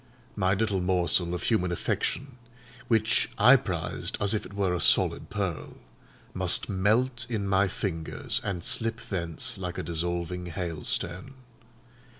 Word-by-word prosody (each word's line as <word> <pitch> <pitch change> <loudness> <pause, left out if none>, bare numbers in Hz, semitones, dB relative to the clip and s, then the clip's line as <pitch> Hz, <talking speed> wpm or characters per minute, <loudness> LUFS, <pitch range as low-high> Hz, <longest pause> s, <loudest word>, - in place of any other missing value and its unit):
My 95 +1 +2
little 100 -2 0
morsel 90 -1 +2
of 90 - -4
human 90 -6 +1
affection, 130 +8 -2 0.5
which 110 -1 +2
I 125 +6 +8
prized 85 - -2
as 100 +1 +2
if 105 - -2
it - - -14
were 95 -3 +1
a 90 - -1
solid - - +3
pearl, 95 -6 -4 0.6
must 90 -1 0
melt 120 +6 +1
in 105 -4 -2
my 100 +1 +3
fingers 85 -4 -2
and 90 -4 -3
slip 115 +3 +1
thence 95 +5 -3
like 90 -2 -4
a - - -3
dissolving 85 +2 -2
hailstone. 85 - -2
95 Hz, 140 wpm, -28 LUFS, 85-110 Hz, 0.6 s, I